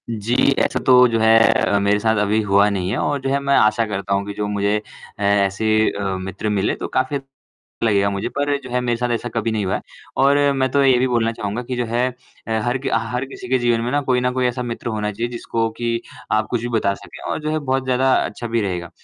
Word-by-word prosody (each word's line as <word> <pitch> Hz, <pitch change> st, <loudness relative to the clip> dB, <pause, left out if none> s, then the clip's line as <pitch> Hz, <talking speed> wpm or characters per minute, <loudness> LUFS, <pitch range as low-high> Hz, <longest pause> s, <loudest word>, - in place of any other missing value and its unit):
जी 115 Hz, +1 st, -2 dB, 0.2 s
ऐसा -, -, +1 dB
तो 125 Hz, -1 st, +7 dB
जो 115 Hz, -1 st, 0 dB
है 110 Hz, 0 st, +5 dB, 0.2 s
अ, 100 Hz, -, +1 dB
मेरे 100 Hz, +1 st, +2 dB
साथ 110 Hz, +1 st, +1 dB
अभी 105 Hz, +2 st, +2 dB
हुआ 100 Hz, 0 st, +3 dB
नहीं 95 Hz, -3 st, -2 dB
है 115 Hz, -, -1 dB
और 145 Hz, -, 0 dB
जो 135 Hz, -, -2 dB
है 140 Hz, +1 st, +1 dB
मैं 140 Hz, 0 st, +1 dB
आशा 110 Hz, +2 st, +3 dB
करता 100 Hz, -2 st, -3 dB
हूँ 100 Hz, 0 st, 0 dB
कि 100 Hz, -, -5 dB
जो 105 Hz, 0 st, -3 dB
मुझे 100 Hz, 0 st, 0 dB, 0.4 s
ऐ 100 Hz, -, -1 dB, 0.2 s
ऐसे 100 Hz, +3 st, -3 dB, 0.2 s
अ, 100 Hz, -, -5 dB
मित्र 95 Hz, +3 st, -4 dB
मिले 100 Hz, -1 st, 0 dB
तो -, -, -5 dB
काफ़ी 130 Hz, +2 st, -1 dB, 0.7 s
लगेगा 100 Hz, -3 st, +3 dB
मुझे 100 Hz, 0 st, -3 dB
पर 145 Hz, 0 st, +1 dB
जो 125 Hz, -, -8 dB
है 125 Hz, +1 st, 0 dB
मेरे 120 Hz, -1 st, 0 dB
साथ 125 Hz, +1 st, -2 dB
ऐसा 120 Hz, +1 st, -2 dB
कभी 115 Hz, 0 st, 0 dB
नहीं 105 Hz, -2 st, -1 dB
हुआ 95 Hz, -, 0 dB
है। -, -, -2 dB, 0.4 s
और 140 Hz, +1 st, +5 dB, 0.2 s
मैं 130 Hz, 0 st, +1 dB
तो 140 Hz, +2 st, +3 dB
ये 130 Hz, -2 st, +5 dB
भी 130 Hz, -, +2 dB
बोलना 115 Hz, -2 st, +1 dB
चाहूँगा 105 Hz, +1 st, -4 dB
कि 125 Hz, +1 st, -5 dB
जो 120 Hz, -, 0 dB
है 120 Hz, +2 st, 0 dB, 0.4 s
अ, -, -, -7 dB
हर 120 Hz, +2 st, 0 dB
कि 135 Hz, -, -4 dB
हर 115 Hz, +3 st, -1 dB
किसी 130 Hz, -2 st, -10 dB
के 130 Hz, +1 st, +2 dB
जीवन 120 Hz, -1 st, +1 dB
में 120 Hz, +1 st, -2 dB
ना 145 Hz, -, +2 dB
कोई 125 Hz, -1 st, +3 dB
न 125 Hz, 0 st, +1 dB
कोई 130 Hz, 0 st, +1 dB
ऐसा 125 Hz, +1 st, -2 dB
मित्र 120 Hz, 0 st, -5 dB
होना 105 Hz, -2 st, -2 dB
चाहिए 115 Hz, +4 st, -3 dB
जिसको 115 Hz, -1 st, -2 dB
कि 115 Hz, -1 st, -1 dB, 0.3 s
आप 110 Hz, 0 st, +2 dB
कुछ 120 Hz, -, 0 dB
भी 120 Hz, -, -3 dB
बता 100 Hz, -2 st, 0 dB
सकें -, -, -13 dB
और -, -, -2 dB
जो 155 Hz, -, -2 dB
है 155 Hz, -, 0 dB
बहुत 135 Hz, -2 st, -1 dB
ज़्यादा 130 Hz, +1 st, +2 dB
अच्छा 120 Hz, -, -5 dB
भी 115 Hz, 0 st, 0 dB
रहेगा। 90 Hz, -4 st, -3 dB
115 Hz, 260 wpm, -20 LUFS, 105-125 Hz, 0.7 s, तो